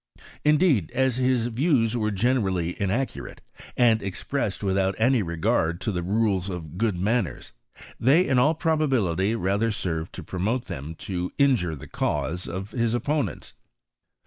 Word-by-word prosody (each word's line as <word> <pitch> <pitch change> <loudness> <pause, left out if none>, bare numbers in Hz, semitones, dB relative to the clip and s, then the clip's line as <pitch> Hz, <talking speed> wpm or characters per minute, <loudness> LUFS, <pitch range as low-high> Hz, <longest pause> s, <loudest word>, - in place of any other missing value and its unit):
Indeed, 150 - +3
as 130 -2 +2
his 130 -2 +2
views 120 -1 +1
were 110 -3 0
gene 120 +6 +1
rally 90 -5 -1
inaccurate, 110 +7 -2 0.4
and 115 -3 +4
expressed 100 +2 -3
without 95 0 +1
any 125 +1 +3
regard 85 -1 0
to 110 - -1
tlie 90 -1 -2
rules 100 -2 +1
of 85 -4 -6
good 110 -5 +1
manners, 105 +2 -1 0.5
they 150 +10 +4
in 130 -2 +3
all 150 +6 +3
probability 125 - +1
lather 100 +2 0
served 85 -6 -3
to - - -7
promote 110 +7 -2
than 75 +4 -6
to 90 -2 -3
injure 125 - +2
the 70 - -10
cause 85 +5 -2
of 95 +4 -5
his 115 0 0
opponents. 145 +4 -2
110 Hz, 145 wpm, -25 LUFS, 90-125 Hz, 0.5 s, and